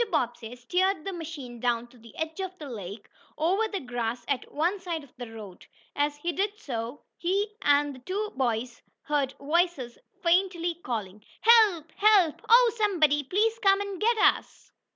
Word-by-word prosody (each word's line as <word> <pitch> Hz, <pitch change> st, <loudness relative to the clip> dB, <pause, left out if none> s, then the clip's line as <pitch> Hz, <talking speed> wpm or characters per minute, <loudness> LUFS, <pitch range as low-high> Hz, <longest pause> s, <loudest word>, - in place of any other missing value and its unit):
Bobbsey 240 Hz, -, -2 dB
steered 360 Hz, +7 st, 0 dB
the 390 Hz, -, -3 dB
machine 300 Hz, -8 st, -7 dB
down 240 Hz, -1 st, 0 dB
to 245 Hz, -, -19 dB
the 230 Hz, 0 st, -16 dB
edge 320 Hz, +2 st, -4 dB
of 375 Hz, -1 st, -5 dB
the 305 Hz, -, -8 dB
lake, 205 Hz, -4 st, -8 dB, 0.3 s
over 380 Hz, +8 st, +2 dB
the 405 Hz, -3 st, -4 dB
grass 240 Hz, -3 st, -4 dB
at 275 Hz, -3 st, -2 dB
one 345 Hz, +7 st, 0 dB
side 340 Hz, -4 st, -4 dB
of 275 Hz, -, -19 dB
the 240 Hz, -2 st, -8 dB
road. 210 Hz, -5 st, -10 dB, 0.3 s
As 290 Hz, 0 st, 0 dB
he 340 Hz, +4 st, -2 dB
did 400 Hz, +4 st, -1 dB
so 240 Hz, -, -5 dB, 0.2 s
he 400 Hz, +4 st, 0 dB
and 290 Hz, 0 st, +3 dB
the 260 Hz, -, -12 dB
two 405 Hz, +10 st, -3 dB
boys 245 Hz, -2 st, -2 dB, 0.2 s
heard 285 Hz, -3 st, 0 dB
voices 300 Hz, -5 st, 0 dB, 0.2 s
faintly 350 Hz, -1 st, +2 dB
calling: 210 Hz, -4 st, -4 dB, 0.2 s
"Help!! 425 Hz, -9 st, +5 dB
Help! 400 Hz, -7 st, +4 dB
Oh, 475 Hz, -1 st, +7 dB
somebody 320 Hz, -9 st, +3 dB
please 430 Hz, -, 0 dB
come 390 Hz, -2 st, +4 dB
and 400 Hz, -2 st, -5 dB
get 465 Hz, +2 st, +3 dB
us!" -, -, +1 dB
315 Hz, 170 wpm, -27 LUFS, 245-390 Hz, 0.3 s, Oh